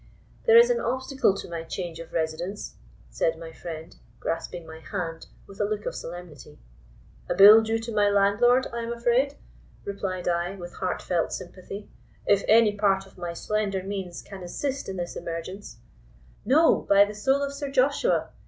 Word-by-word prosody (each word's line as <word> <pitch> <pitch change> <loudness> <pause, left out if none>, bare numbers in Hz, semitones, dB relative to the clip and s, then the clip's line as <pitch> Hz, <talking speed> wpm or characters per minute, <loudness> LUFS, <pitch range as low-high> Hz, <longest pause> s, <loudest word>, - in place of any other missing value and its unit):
"There 455 0 +8
is 475 +1 +7
an 480 - +1
obstacle 260 - 0
to - - -7
my 170 -1 -5
change 170 -1 -5
of 165 - -9
residence," 170 +5 -3 0.4
said 160 - 0
my 165 0 -9
friend, 160 -1 -8 0.2
grasping 165 +1 -4
my 160 0 -10
hand 165 -2 -5 0.2
with 195 +1 -8
a - - +3
look 210 0 -2
of - - -2
solemnity. 170 -4 -9 0.7
"A - - 0
bill 205 +4 +10
due 225 0 0
to 225 0 -6
my 205 -1 +3
landlord, 205 +6 +4
I 235 - -3
am 230 0 -4
afraid?" 240 +4 +1 0.5
replied 190 -2 -4
I, 175 +2 0
with 175 -2 -9
heartfelt 180 -2 -2
sympathy; 185 +3 -8 0.4
"if 200 -1 +3
any 220 -1 +5
part 195 -2 +2
of 195 - -18
my 175 -1 -4
slender 200 0 -2
means 190 -3 -5
can 195 -2 -10
assist 270 +10 -4
in 190 - -5
this 175 -1 -4
emergence——" 170 - -6 0.7
"No, 315 +5 +5
by 200 0 +5
the 210 - -7
soul 265 +7 +1
of 280 0 -3
Sir 280 0 -5
Joshua!" 275 - +1
200 Hz, 170 wpm, -26 LUFS, 175-230 Hz, 0.7 s, bill